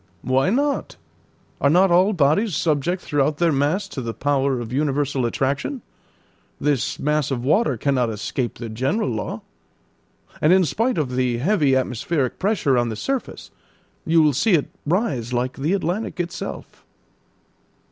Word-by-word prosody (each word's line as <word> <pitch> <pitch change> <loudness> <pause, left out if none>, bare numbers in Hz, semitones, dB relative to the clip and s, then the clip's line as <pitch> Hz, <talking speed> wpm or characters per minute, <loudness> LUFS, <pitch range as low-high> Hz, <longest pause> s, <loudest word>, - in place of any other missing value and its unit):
"Why 130 +6 +2
not? 280 +6 0 0.7
Are 140 - +4
not 180 +4 +4
all 185 +4 +4
bodies 170 +3 +2
subject 165 +3 0
throughout 145 +1 0
their 170 0 +2
mass 150 +8 0
to 140 -2 -5
the 115 -2 -5
power 140 -2 0
of 120 0 -6
universal 140 -2 0
attraction? 140 - -2 0.8
This 145 -4 0
mass 150 -1 0
of 125 -3 -2
water 155 - +2
cannot 130 -1 +1
escape 115 +3 -3
the 120 - -6
general 130 - -1
law. 110 -3 -4 1.0
And 155 - +4
in 185 -1 +5
spite 225 - 0
of 145 -5 -1
the 125 -2 +1
heavy 145 - +2
atmospheric 130 +2 -1
pressure 175 - +2
on 120 -1 0
the 110 - -4
surface, 270 - -4 0.5
you 165 0 +4
will 150 -1 +3
see 200 - +2
it 155 -5 +1 0.2
rise 145 - 0
like 125 +1 -1
the 150 +7 0
Atlantic 190 +2 -2
itself." 175 0 -6
145 Hz, 150 wpm, -22 LUFS, 130-180 Hz, 1.0 s, in